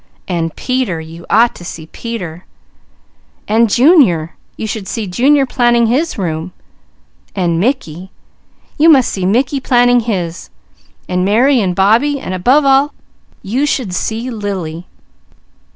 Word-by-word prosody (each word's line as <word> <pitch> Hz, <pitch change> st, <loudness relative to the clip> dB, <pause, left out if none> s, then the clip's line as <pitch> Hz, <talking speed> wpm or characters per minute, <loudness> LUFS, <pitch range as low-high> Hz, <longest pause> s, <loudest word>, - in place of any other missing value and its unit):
And 165 Hz, -3 st, -2 dB
Peter! 255 Hz, -10 st, -2 dB
You 165 Hz, +2 st, -11 dB
ought 230 Hz, +3 st, +4 dB
to -, -, -12 dB
see 160 Hz, -2 st, -8 dB
Peter! 180 Hz, -4 st, -7 dB, 1.0 s
And 225 Hz, +2 st, +3 dB
Junior! 235 Hz, -, +3 dB, 0.2 s
You -, -, -4 dB
should 215 Hz, -2 st, -5 dB
see 220 Hz, +2 st, -3 dB
Junior 270 Hz, +9 st, +2 dB
planning 240 Hz, -2 st, +2 dB
his 275 Hz, +9 st, 0 dB
room. 170 Hz, -2 st, -4 dB, 0.8 s
And 170 Hz, -4 st, 0 dB
Mickey! 190 Hz, -, -2 dB, 0.7 s
You 320 Hz, +2 st, +6 dB
must 270 Hz, -6 st, +4 dB
see 185 Hz, -2 st, -2 dB
Mickey 260 Hz, +7 st, +1 dB
planning 245 Hz, -1 st, +3 dB
his! 185 Hz, -7 st, -4 dB, 0.6 s
And 180 Hz, 0 st, -1 dB
Mary 240 Hz, +6 st, +3 dB
and 185 Hz, -3 st, -1 dB
Bobbie! 230 Hz, +10 st, +2 dB
And 185 Hz, -, -6 dB
above 255 Hz, +11 st, +2 dB
all, 275 Hz, +2 st, +3 dB, 0.5 s
you 255 Hz, +9 st, -1 dB
should 245 Hz, -10 st, -2 dB
see 225 Hz, +6 st, -3 dB
Lily! 185 Hz, -6 st, -5 dB
220 Hz, 135 wpm, -15 LUFS, 180-255 Hz, 1.0 s, You